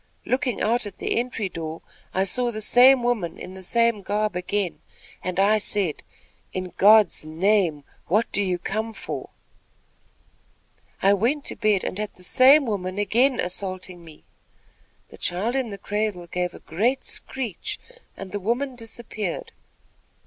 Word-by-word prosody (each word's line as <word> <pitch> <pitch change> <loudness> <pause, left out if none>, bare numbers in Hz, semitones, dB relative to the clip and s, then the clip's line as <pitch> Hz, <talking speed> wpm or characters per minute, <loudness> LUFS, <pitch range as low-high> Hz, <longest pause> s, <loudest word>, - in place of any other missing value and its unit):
Looking 255 -3 0
out 230 0 +1
at 200 - -10
the - - 0
entry 235 -4 -2
door, 165 -2 -6 0.3
I 190 - +1
saw 240 +6 +1
the 215 -2 -4
same 250 +4 +6
woman, 220 -9 -1
in 185 - -8
the 190 - -9
same 230 +2 +2
garb 210 0 -1
again, 180 0 -2 0.4
and 185 0 -2
I 210 +2 +4
said, 200 -6 -1 0.5
'In 185 -1 -4
God's 210 -3 +6
name, 165 -1 +1 0.2
what 210 +6 +3
do 205 - +1
you 185 -3 0
come 220 +5 -3
for?' - - -6 1.7
I 195 +1 +6
went 245 +9 0
to - - -2
bed 210 -3 +2
and 190 - -4
had 210 -1 -4
the 180 - -13
same 270 +9 +6
woman 190 -4 -3
again 240 +6 +2
assaulting 185 -1 -4
me. 160 -2 -14 0.9
The - - -14
child 205 +8 0
in 260 -4 0
the 200 - -6
cradle 205 -2 -2
gave 180 +1 -3
a - - -10
great 235 +11 0
screech, 240 -9 -3 0.4
and 195 -1 -8
the 205 - -3
woman 245 +7 -1
disappeared. 235 - -5
205 Hz, 155 wpm, -24 LUFS, 185-235 Hz, 1.7 s, same